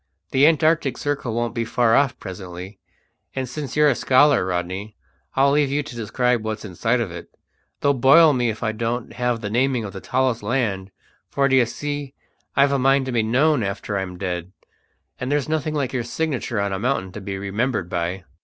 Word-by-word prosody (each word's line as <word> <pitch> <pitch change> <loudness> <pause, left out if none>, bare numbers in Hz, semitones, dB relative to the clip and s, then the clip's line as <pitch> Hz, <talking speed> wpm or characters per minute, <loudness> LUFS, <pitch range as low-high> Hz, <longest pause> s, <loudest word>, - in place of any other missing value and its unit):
The 135 +3 +5
Antarctic 155 -3 +2
circle 140 -5 -2
won't 120 -1 -1
be 115 -1 -1
far 115 0 +2
off 140 -2 +2
presently, 95 0 -8 0.6
and 130 -1 -2
since 140 +1 -6
you're 150 0 +6
a 145 - +4
scholar, 140 -1 +4
Rodney, 95 +4 -3 0.4
I'll 140 +1 +4
leave 145 -1 +2
you 145 +2 0
to 140 -4 -9
describe 120 +1 0
what's 110 -1 -4
inside 115 +6 0
of 110 -7 -2
it, 85 0 -9 0.5
though 140 - +3
boil 145 +5 +6
me 125 -2 +1
if 110 +2 -5
I 110 - +1
don't 115 +2 -3
have 125 -2 -1
the 105 - -3
naming 125 0 +1
of 100 - -7
the 95 - -7
tallest 130 -2 0
land; 105 -4 -1 0.4
for, 140 0 +2
d'ye 130 -2 +4
see, 145 +2 -5 0.4
I've 140 0 +4
a 140 - +1
mind 135 +1 +3
to 130 - -3
be 120 -2 +2
known 130 +6 +2
after 100 0 -3
I'm 95 -2 -3
dead, 90 -1 -4 0.7
and 130 +2 -3
there's 145 -2 +1
nothing 155 0 -1
like 140 -4 -1
your 125 -2 -1
signature 130 -3 -2
on 100 -1 -1
a 95 - -2
mountain 110 -6 -1
to 105 - -8
be 95 0 -5
remembered 100 +1 -1
by." 90 +2 -3
120 Hz, 200 wpm, -22 LUFS, 100-140 Hz, 0.7 s, you're